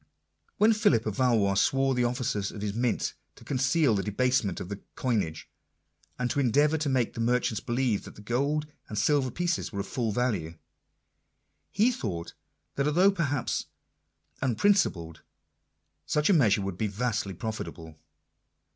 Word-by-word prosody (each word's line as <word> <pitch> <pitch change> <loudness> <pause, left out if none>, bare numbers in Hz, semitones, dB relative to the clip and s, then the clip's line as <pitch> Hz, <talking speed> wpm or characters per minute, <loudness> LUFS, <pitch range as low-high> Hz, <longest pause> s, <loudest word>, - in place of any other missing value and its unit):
When 220 +2 +5
Philip 205 - +2
of 110 -2 -3
Valois 115 -6 +3
swore 135 +7 +2
the 125 -1 +1
officers 120 -5 -1
of 105 - -7
his 105 -1 -2
mint 120 +2 0 0.2
to - - -16
conceal 135 0 +2
the 100 - +1
debasement 105 -1 0
of 90 - -6
the 100 +1 -5 0.2
coinage, 100 -11 -1 0.7
and 125 - 0
to - - -1
endeavour 145 +5 +3
to 150 -1 -1
make 130 -4 +1
the - - -8
merchants 120 -1 +1
believe 120 -3 -1
that - - -11
the 105 - -13
gold 140 +7 0 0.2
and 105 - -5
silver 130 +5 +2
pieces 175 +6 -2
were 100 -2 -3
of - - -6
full 120 -5 -2
value, 100 -9 -1 1.1
he 220 +5 +3
thought 90 - -4 0.4
that 140 +1 +1
although 180 +6 +4
perhaps 145 -8 -1 0.7
unprin 135 - +3
cipled, 85 - -1 0.9
such 150 +6 +2
a - - +6
measure 110 - +4
would 95 -2 -5
be 110 - +1
vastly 105 -2 -2
profitable. 85 -7 -6
120 Hz, 155 wpm, -28 LUFS, 105-140 Hz, 1.1 s, a